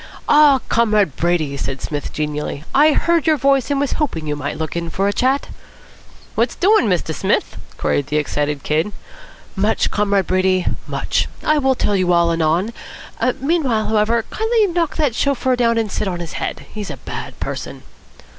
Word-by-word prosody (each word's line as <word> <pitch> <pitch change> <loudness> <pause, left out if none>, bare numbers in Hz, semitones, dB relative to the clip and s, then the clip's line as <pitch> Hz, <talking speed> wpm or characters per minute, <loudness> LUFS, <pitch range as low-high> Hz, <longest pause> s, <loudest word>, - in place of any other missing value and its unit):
"Ah, 295 -3 +6
Comrade 210 - +2
Brady!" 165 -5 0
said 135 0 -4
Psmith 145 +1 -4
genially. 150 -1 -3
"I 300 +2 +5
heard 335 0 +1
your 310 -1 +4
voice, 275 -1 +2
and 285 -1 +1
was 280 -1 0
hoping 165 - -1
you 150 -1 -2
might 145 +1 -4
look 160 0 -4
in 170 -1 -3
for 195 +4 0
a 205 - +1
chat." 265 +5 +1 0.8
"What's - - 0
doin', 400 - +4
Mr. 175 -4 0
Smith?" - - 0 0.2
queried 140 - 0
the 150 - 0
excited 145 -1 -1
Kid. 160 +7 0 0.6
"Much, 210 +3 +1
Comrade 200 -2 +1
Brady, 185 0 +1 0.2
much. - - -1 0.2
I 305 0 +3
will 265 -2 +2
tell 205 - 0
you 185 -2 +2
all 170 -1 +3
anon. 165 +6 +1 0.7
Meanwhile, 270 -6 0
however, 220 +1 +2
kindly 445 0 +2
knock 340 -4 -1
that 295 -7 +1
chauffeur 260 0 +1
down 230 -1 +2
and 220 -3 -1
sit 205 - -2
on 180 -2 -3
his 170 -2 -6
head. - - -4
He's 210 -2 -5
a - - -6
bad - - -7
person." - - -5
210 Hz, 175 wpm, -19 LUFS, 165-275 Hz, 0.8 s, Ah